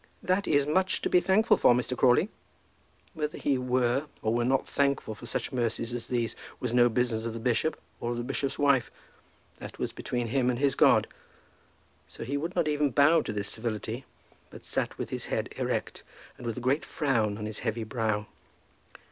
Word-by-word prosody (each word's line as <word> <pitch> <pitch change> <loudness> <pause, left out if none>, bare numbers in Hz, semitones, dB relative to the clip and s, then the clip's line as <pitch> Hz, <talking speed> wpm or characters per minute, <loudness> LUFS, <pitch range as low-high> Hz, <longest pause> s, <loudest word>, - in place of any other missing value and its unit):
"That 185 +2 +1
is 145 -2 +3
much 185 +5 +2
to - - -1
be 180 - +6
thankful 200 +5 +3
for, 120 - +5
Mr. 125 +1 0
Crawley." 130 - +4 0.8
Whether 155 -3 -3
he 135 -3 0
were 125 +2 +1 0.2
or 110 - +1
were 120 0 +1
not 130 +2 +1
thankful 140 -5 0
for 105 - -9
such - - -1
mercies 115 -1 -1
as 120 -1 -3
these 120 -3 -1 0.2
was 125 -2 -2
no 120 0 +5
business 115 -1 0
of 115 - -4
the 115 - -5
bishop 125 +6 0 0.2
or 120 - -3
of 120 - -2
the 120 - -2
bishop's 135 +2 -2
wife. 140 -4 +3 0.7
That - - -9
was - - -2
between 120 -2 -3
him 125 0 +1
and 125 - 0
his 140 0 +3
God. - - +5 1.0
So - - -8
he 130 +5 -3
would 165 +6 -3
not - - +1
even 150 -1 +1
bow 145 +5 +5
to 115 - -4
this 100 -1 -1
civility, 115 +2 -3 0.4
but - - -12
sat - - -2
with - - -5
his - - -3
head - - -2
erect, - - -2 0.3
and 120 - -8
with 115 - -3
a - - -4
great 135 +5 +1
frown 115 -8 0
on 105 - -5
his 110 0 -4
heavy 115 -1 -2
brow. 110 -2 -1
125 Hz, 200 wpm, -28 LUFS, 115-140 Hz, 1.0 s, be